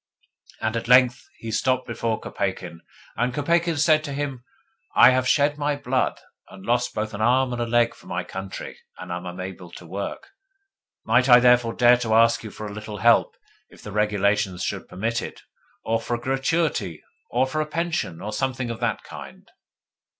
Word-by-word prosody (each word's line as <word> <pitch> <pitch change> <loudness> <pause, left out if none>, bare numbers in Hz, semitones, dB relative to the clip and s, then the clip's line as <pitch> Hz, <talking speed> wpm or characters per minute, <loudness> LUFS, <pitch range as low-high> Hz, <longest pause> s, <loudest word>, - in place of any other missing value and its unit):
And 110 +1 -1
at 115 - -3
length 125 0 +4
he 115 - -6
stopped 130 +3 +1
before 115 -2 -2
Kopeikin, 95 -3 -4 0.4
and 125 +2 -1
Kopeikin 170 +2 +1
said 155 +1 +4
to 140 - -5
him: 135 -3 -4 0.5
'I - - +8
have 130 0 +1
shed 145 +2 +2
my 145 0 0
blood, 130 -2 -1 0.3
and 95 0 -13
lost 125 +1 0
both 110 +1 -3
an 105 - -5
arm 125 +2 +3
and 120 - -3
a 120 - -1
leg, 120 0 +2
for - - -18
my 90 0 -3
country, 95 +2 -7 0.2
and - - -8
am 90 +1 -5
unable 90 0 -7
to 90 - -11
work. 100 - -6 0.8
Might 125 +4 +3
I 120 0 +9
therefore 125 -1 +4
dare 120 0 +5
to 110 -2 0
ask 115 +1 +4
you 110 - -6
for 105 - -8
a 105 - -6
little 105 0 -7
help, 115 +4 +3 0.3
if - - -17
the 105 - -8
regulations 100 -2 +1
should - - -4
permit 115 +5 -2
of - - -4
it, - - -15 0.4
or 115 0 0
for 120 - -2
a - - -5
gratuity, 135 - -1 0.3
or 125 +2 +2
for 155 +4 -2
a 155 - -3
pension, 165 - -2
or 105 +1 -5
something 130 -3 -2
of 115 - -6
the 115 -4 0
kind? - - -11
120 Hz, 190 wpm, -24 LUFS, 105-130 Hz, 0.8 s, I